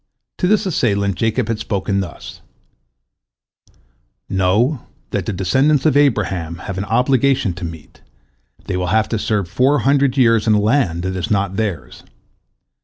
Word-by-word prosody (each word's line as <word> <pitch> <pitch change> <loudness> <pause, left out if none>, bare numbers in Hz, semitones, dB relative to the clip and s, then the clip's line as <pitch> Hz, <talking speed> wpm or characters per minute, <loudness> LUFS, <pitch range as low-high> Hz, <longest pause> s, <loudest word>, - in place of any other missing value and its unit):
To 180 - +1
this 215 +2 +2
assailant 100 - 0
Jacob 115 +4 -1
had 115 -2 -2
spoken 100 -2 -2
thus: 95 -3 -7 1.9
"Know 105 +9 0 0.2
that - - -2
the - - 0
descendants 130 - +1
of 155 - +3
Abraham 100 - +1
have 95 -1 -4
an 100 - -3
obligation 125 -2 +1
to 90 +1 -7
meet, 80 -2 -10 0.6
they 95 - -3
will 90 0 -2
have 110 +4 +2
to 115 - -1
serve 105 -4 -1
four 135 +10 +2
hundred 140 -1 +2
years 115 -3 +3
in 110 - +4
a - - +3
land 105 -6 +1
that 95 0 -3
is 95 +4 -3
not 100 -3 0
theirs. 90 - -4
105 Hz, 155 wpm, -18 LUFS, 95-130 Hz, 1.9 s, in